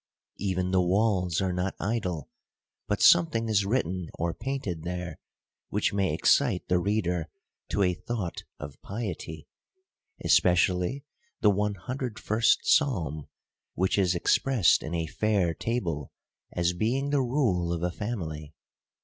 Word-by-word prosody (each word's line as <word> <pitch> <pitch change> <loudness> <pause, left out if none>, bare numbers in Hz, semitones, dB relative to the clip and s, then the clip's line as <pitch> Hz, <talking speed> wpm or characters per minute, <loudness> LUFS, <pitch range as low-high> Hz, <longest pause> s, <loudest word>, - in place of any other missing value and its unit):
Even 95 -2 -1
the 95 -1 +4
walls 90 -2 +1
are 95 -1 0
not 90 +2 -2
idle; 95 - -2 0.6
but - - 0
something 115 +7 +5
is 105 -3 +2
written 95 -7 -1
or 85 0 -1
painted 130 -12 -4
there, 90 -1 -5 0.5
which - - 0
may 95 -3 +1
excite 100 - +2
the 90 - +2
reader 90 -4 -1 0.4
to 100 - +1
a 90 -1 +2
thought 100 -1 -4 0.2
of 75 -1 -9
piety: 90 -7 -6 0.8
especially 90 - +3 0.4
the 105 - +5
101st 110 +3 0
Psalm; 85 - +1 0.5
which 95 +2 +1
is 90 -2 +2
expressed 115 +3 +3
in 80 - -4
a 85 -1 -1
fair 95 0 +1
table, 85 - -3 0.4
as 90 0 0
being 130 +9 0
the 145 -2 +3
rule 120 - +1
of 85 0 -2
a 90 - 0
family. 80 -8 -5
95 Hz, 130 wpm, -28 LUFS, 85-110 Hz, 0.8 s, something